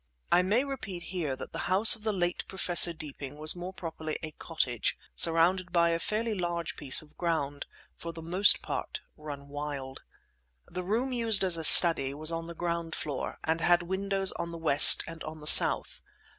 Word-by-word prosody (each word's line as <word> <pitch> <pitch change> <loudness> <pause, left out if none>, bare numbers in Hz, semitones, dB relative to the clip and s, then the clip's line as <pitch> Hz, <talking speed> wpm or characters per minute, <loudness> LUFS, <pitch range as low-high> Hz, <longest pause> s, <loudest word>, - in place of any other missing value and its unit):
I 180 - +2
may 210 +8 -2
repeat 205 -11 -9
here 155 -7 -5
that - - -12
the - - -8
house 200 +6 +6
of 220 - -14
the 215 0 -4
late 175 -3 -5
Professor 175 -2 +4
Deeping 145 -3 -12
was 155 +2 0
more 180 +1 -9
properly 160 -4 -9
a 155 - -8
cottage, 130 -8 -5 0.2
surrounded 170 +2 0
by 170 -1 0
a 165 - -4
fairly 220 +4 -5
large 175 -3 -6
piece 140 +1 0
of 150 - -24
ground, 150 -5 -5 0.3
for 170 - -10
the 165 -1 -13
most 185 +5 +2
part - - -8
run 145 -2 -12
wild. 140 -2 -9 0.6
The 180 - -9
room 230 +8 -5
used 230 -5 0
as 185 -3 +4
a 165 - -6
study 155 -5 +9
was 155 +2 +4
on 165 0 -7
the 170 - -12
ground 170 -1 -6
floor, 145 -4 -7
and 160 +1 -4
had 175 0 0
windows 195 +1 -2
on 170 - -6
the 170 - -11
west 155 -3 +3
and 165 -1 -13
on 155 0 -11
the 150 - -15
south. - - +4
170 Hz, 190 wpm, -26 LUFS, 155-185 Hz, 0.6 s, study